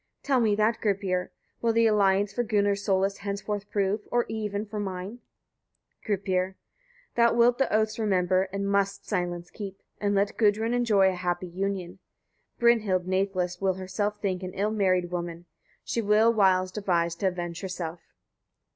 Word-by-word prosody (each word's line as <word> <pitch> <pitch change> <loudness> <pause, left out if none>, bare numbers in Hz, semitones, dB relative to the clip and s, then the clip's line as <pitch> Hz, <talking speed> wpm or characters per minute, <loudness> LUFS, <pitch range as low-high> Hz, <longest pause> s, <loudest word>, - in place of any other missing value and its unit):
Tell 270 -2 +2
me 215 -3 +3
that, 215 +2 +1
Gripir! 195 -3 0 0.3
Will 230 -1 +2
the 230 0 +4
alliance 200 -2 +3
for 240 - 0
Gunnar's 205 -3 +1
solace 195 0 +1
henceforth 200 0 -4
prove, 205 +1 -1
or 240 0 +2
even 210 -1 -3
for 210 0 -6
mine? 195 +3 -5 0.8
Gripir. 190 -2 -1 0.6
45. - - -45
Thou 235 0 +5
wilt 240 +1 +4
the 270 - +1
oaths 215 +1 +1
remember, 185 -2 +1
and 200 +1 -2
must 200 0 0
silence 175 -3 -2
keep, 195 -3 -8 0.2
and 205 -1 0
let 200 +1 +1
Gudrun 220 +2 +2
enjoy 215 -6 +4
a - - -5
happy 180 0 -2
union. 190 0 -3 0.6
Brynhild 220 -7 +3
nathless 185 -1 -1
will 190 -1 +1
herself 200 +3 -3
think 190 -3 -2
an 185 -1 -6
ill 210 +2 0
married 185 -4 +1
woman. 175 -1 -4 0.4
She 230 - -1
will 215 +2 +4
wiles 185 -3 +3
devise 175 -5 0
to 195 - 0
avenge 175 -2 -4
herself. 180 -3 -5
200 Hz, 160 wpm, -27 LUFS, 185-210 Hz, 0.8 s, Thou